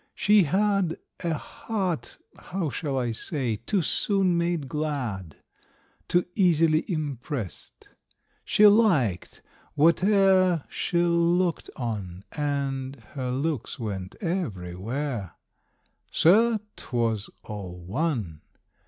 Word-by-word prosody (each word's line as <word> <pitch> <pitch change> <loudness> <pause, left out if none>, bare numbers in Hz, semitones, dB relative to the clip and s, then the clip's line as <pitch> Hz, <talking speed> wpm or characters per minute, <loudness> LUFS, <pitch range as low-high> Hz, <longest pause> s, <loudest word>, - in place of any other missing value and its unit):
She 205 -3 +5
had 195 +1 +1 0.2
A 170 -3 -1
heart 185 0 -4 0.2
how 175 -5 -4
shall 140 -3 -2
I 120 -2 0
say 120 -1 -2
too 175 - 0
soon 195 +1 +2
made 170 -4 0
glad, 130 - -3 0.7
Too 175 0 +2
easily 165 -3 +3
impressed; 145 - -5 0.6
she 210 - +4
liked 175 - +3 0.3
whate'er 185 +1 +4
She 175 - -2
looked 170 0 +2
on, 100 -7 -4
and 140 -3 -2 0.2
her 130 -3 -3
looks 140 +1 -2
went 100 -5 -5
everywhere. 115 - -3 0.8
Sir, 220 +6 +4 0.2
'twas 115 -4 -1
all 100 -4 -7
one! 100 - -2
150 Hz, 95 wpm, -26 LUFS, 115-175 Hz, 0.8 s, She